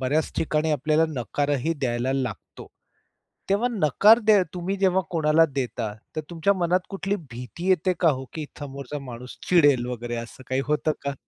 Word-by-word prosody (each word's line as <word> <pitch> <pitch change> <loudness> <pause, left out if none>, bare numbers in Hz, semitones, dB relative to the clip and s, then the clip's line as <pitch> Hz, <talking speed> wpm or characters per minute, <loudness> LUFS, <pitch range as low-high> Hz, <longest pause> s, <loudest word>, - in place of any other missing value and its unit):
बऱ्याच 145 +4 0
ठिकाणी 155 0 0
आपल्याला 155 +3 +2
नकारही 145 +3 -1
द्यायला 130 -2 -1
लागतो. 125 -6 -5 0.8
तेव्हा 205 +5 +2
नकार 210 - +5
दे 210 -3 +6
तुम्ही 180 +3 -2
जेव्हा 190 -1 +3
कोणाला 160 -1 +4
देता. 120 -5 -2 0.2
तर 155 - 0
तुमच्या 170 +4 +2
मनात 180 0 +1
कुठली 195 +1 -2
भीती 125 - -6
येते 185 0 +3
का 170 - +5
हो, 130 -1 -3
की 155 -2 -5 0.2
समोरचा 140 0 -6
माणूस 125 -2 -9
चिडेल 145 -8 +4
वगैरे 120 -1 -4
असं 115 +2 -8
काही 130 +1 0
होतं 150 +1 +1
का? 140 0 -2
150 Hz, 160 wpm, -25 LUFS, 130-175 Hz, 0.8 s, दे